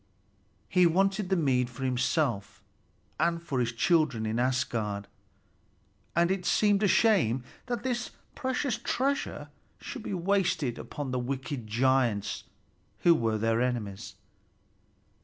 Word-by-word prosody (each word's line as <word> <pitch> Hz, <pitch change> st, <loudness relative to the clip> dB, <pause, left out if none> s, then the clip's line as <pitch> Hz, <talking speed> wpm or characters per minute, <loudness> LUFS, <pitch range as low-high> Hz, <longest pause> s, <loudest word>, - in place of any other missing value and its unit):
He 180 Hz, -1 st, +4 dB
wanted 195 Hz, +3 st, +1 dB
the 190 Hz, -, +3 dB
mead 130 Hz, -7 st, +2 dB
for 125 Hz, +2 st, -8 dB
himself 125 Hz, -3 st, 0 dB, 0.6 s
and 170 Hz, 0 st, +2 dB
for 160 Hz, -6 st, -3 dB
his 120 Hz, -1 st, +1 dB
children 140 Hz, -2 st, +2 dB
in 110 Hz, +2 st, -1 dB
Asgard, 115 Hz, -5 st, -1 dB, 1.1 s
and 170 Hz, +2 st, +3 dB
it 190 Hz, -1 st, -1 dB
seemed 205 Hz, +2 st, +3 dB
a 210 Hz, -, +4 dB
shame 185 Hz, -, +3 dB, 0.2 s
that 240 Hz, -2 st, -3 dB
this 245 Hz, -2 st, -2 dB, 0.2 s
precious 260 Hz, -1 st, -1 dB
treasure 275 Hz, +2 st, -1 dB, 0.3 s
should 265 Hz, -, -7 dB
be 200 Hz, -, -4 dB
wasted 175 Hz, -8 st, 0 dB
upon 145 Hz, -3 st, -5 dB
the 125 Hz, -, 0 dB
wicked 130 Hz, -1 st, -4 dB
giants 120 Hz, -2 st, +1 dB, 0.6 s
who 170 Hz, -, +6 dB
were 115 Hz, -7 st, 0 dB
their 115 Hz, +2 st, +1 dB
enemies. 115 Hz, -6 st, -3 dB
140 Hz, 125 wpm, -29 LUFS, 120-190 Hz, 1.1 s, who